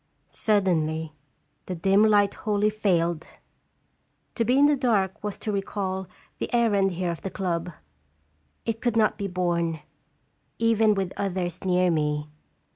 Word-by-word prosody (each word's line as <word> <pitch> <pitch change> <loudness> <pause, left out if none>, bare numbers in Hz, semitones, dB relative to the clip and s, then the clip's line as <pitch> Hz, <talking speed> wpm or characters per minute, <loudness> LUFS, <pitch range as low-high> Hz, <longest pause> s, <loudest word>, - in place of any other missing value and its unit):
Suddenly 160 -7 0 0.5
the 185 - -3
dim 195 +5 +3
light 205 -2 +4
wholly 210 0 0
failed. 175 -6 0 1.1
To 230 - 0
be 250 +4 +2
in 285 - +6
the 295 0 +4
dark 215 -7 0
was 210 -1 -3
to 215 - -3
recall 195 -1 -3 0.3
the - - -3
errand 200 -5 +2
here 175 0 -2
of 170 - -7
the 195 - -4
club. 180 -3 -2 0.9
It 225 0 -2
could 240 -2 0
not 215 -1 +2
be 200 - -2
borne, 170 -3 -1 0.8
even 225 -2 +3
with 190 -2 -2
others 180 -3 -3
near 180 -1 +2
me. 150 -1 -1
195 Hz, 140 wpm, -25 LUFS, 175-215 Hz, 1.1 s, in